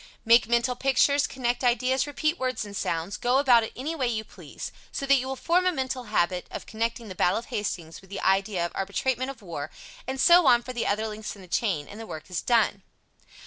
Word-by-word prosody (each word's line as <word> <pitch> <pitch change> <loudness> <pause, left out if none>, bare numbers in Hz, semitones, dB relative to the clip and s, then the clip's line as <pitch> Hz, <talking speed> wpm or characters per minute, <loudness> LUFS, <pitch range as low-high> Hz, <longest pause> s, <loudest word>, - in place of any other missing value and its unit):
Make 230 0 +6
mental 235 +2 +2
pictures, 275 +2 +3
connect 245 -1 -2
ideas, 255 +2 +2
repeat 305 +4 -1
words 255 -4 -2
and 200 -1 -9
sounds, 170 +1 -2
go 245 +2 +2
about 255 -4 +5
it 220 - -5
any 285 +6 -3
way 270 -6 -1
you 220 -2 -1
please, - - -9 0.2
so 275 - -3
that 275 - +4
you 260 0 -2
will 265 - -3
form 355 +6 +2
a - - +4
mental 260 -4 -3
habit 180 -4 0
of - - -7
connecting 230 +1 -3
the 190 - -6
"battle 180 0 +2
of 230 - -7
Hastings" 175 -5 -4
with 190 - -19
the 195 - -5
idea 195 -2 +1
of 170 - -4
"arbitrament 250 +7 -1
of 245 -6 -9
war," 155 -5 -5 0.4
and 265 0 -3
so 345 +3 +6
on 240 0 +5
for 255 - -6
the 240 - -2
other 215 +2 0
links 215 0 -6
in 195 - -13
the - - -13
chain, 175 -6 -1
and 205 - -10
the 225 - -8
work 155 +1 -8
is 180 - -1
done. 225 -4 +2
235 Hz, 230 wpm, -26 LUFS, 200-260 Hz, 0.4 s, Make